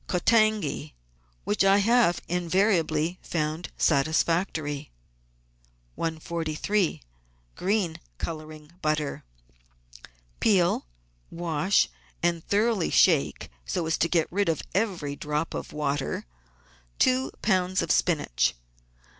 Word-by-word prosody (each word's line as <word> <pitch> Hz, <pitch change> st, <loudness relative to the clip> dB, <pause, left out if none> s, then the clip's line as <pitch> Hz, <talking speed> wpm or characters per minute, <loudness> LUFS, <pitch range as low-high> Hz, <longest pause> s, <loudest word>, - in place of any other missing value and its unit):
Kotangi, 215 Hz, -, +1 dB, 0.5 s
which 205 Hz, -, +1 dB
I 195 Hz, +1 st, +5 dB
have 220 Hz, -3 st, +3 dB
invariably 175 Hz, -2 st, +1 dB
found 155 Hz, +1 st, -3 dB
satisfactory. 155 Hz, 0 st, +1 dB, 1.1 s
143— 165 Hz, +3 st, -1 dB, 0.5 s
GREEN 190 Hz, -3 st, 0 dB, 0.2 s
COLOURING 155 Hz, -, -7 dB
BUTTER 155 Hz, -2 st, -1 dB, 1.2 s
Peel, 180 Hz, -, +2 dB, 0.4 s
wash, 170 Hz, +2 st, +1 dB, 0.4 s
and 170 Hz, -1 st, +1 dB
thoroughly 210 Hz, -3 st, +2 dB
shake 160 Hz, -, +3 dB
(so 165 Hz, -, -2 dB
as 160 Hz, 0 st, 0 dB
to 165 Hz, -, +2 dB
get 165 Hz, -2 st, +2 dB
rid 200 Hz, 0 st, +1 dB
of 160 Hz, -, -1 dB
every 180 Hz, -8 st, -1 dB
drop 150 Hz, +2 st, -2 dB
of -, -, -5 dB
water) 145 Hz, -2 st, -2 dB, 0.7 s
two 130 Hz, -, +2 dB
lbs. 185 Hz, -2 st, +2 dB
of -, -, -1 dB
spinach. 145 Hz, -, +1 dB
165 Hz, 95 wpm, -27 LUFS, 155-190 Hz, 1.2 s, I